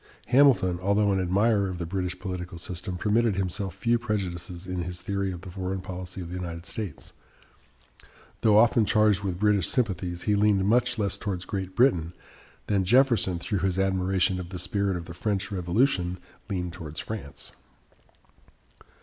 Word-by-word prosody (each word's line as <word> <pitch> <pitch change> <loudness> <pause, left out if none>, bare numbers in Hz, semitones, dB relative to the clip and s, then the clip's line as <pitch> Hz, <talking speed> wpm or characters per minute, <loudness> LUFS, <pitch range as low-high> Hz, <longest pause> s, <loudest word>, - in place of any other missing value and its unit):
Hamilton, 120 -10 +4
although 100 +2 +2
an 95 - +1
admirer 100 +2 +2
of 90 - -5
the 85 - -3
British 90 0 -3
political 90 -2 -5
system, 90 +1 -5
permitted 110 +2 +2
himself 95 -1 -2
few 120 0 +1
prejudices 90 -6 -4
in 90 -1 -3
his 90 0 -5
theory 100 0 -2
of 85 -2 -7
the 95 0 -9
foreign 95 +1 -3
policy 90 0 -7
of 85 - -6
the - - -7
United 85 -2 -5
States. 100 -6 -6 1.3
Though 105 -2 +5
often 115 0 +5
charged 105 -1 +3
with 95 -3 -2
British 105 -3 +2
sympathies, 90 -7 -1
he 105 - +2
leaned 100 -2 +3
much 120 +3 +2
less 100 -2 0
towards 95 -4 -4
Great 95 -2 -4
Britain 90 -10 +3 0.5
than 100 -2 +1
Jefferson, 115 -4 +3
through 95 +3 -2
his 95 0 0
admiration 95 -1 +1
of 90 -1 -6
the 90 - -6
spirit 95 +1 -1
of 85 - -7
the 85 - -8
French 100 +1 -2
Revolution, 90 0 +1 0.3
leaned 90 -3 -3
towards 80 -4 -7
France. 105 -10 -7
95 Hz, 165 wpm, -27 LUFS, 90-105 Hz, 1.3 s, Though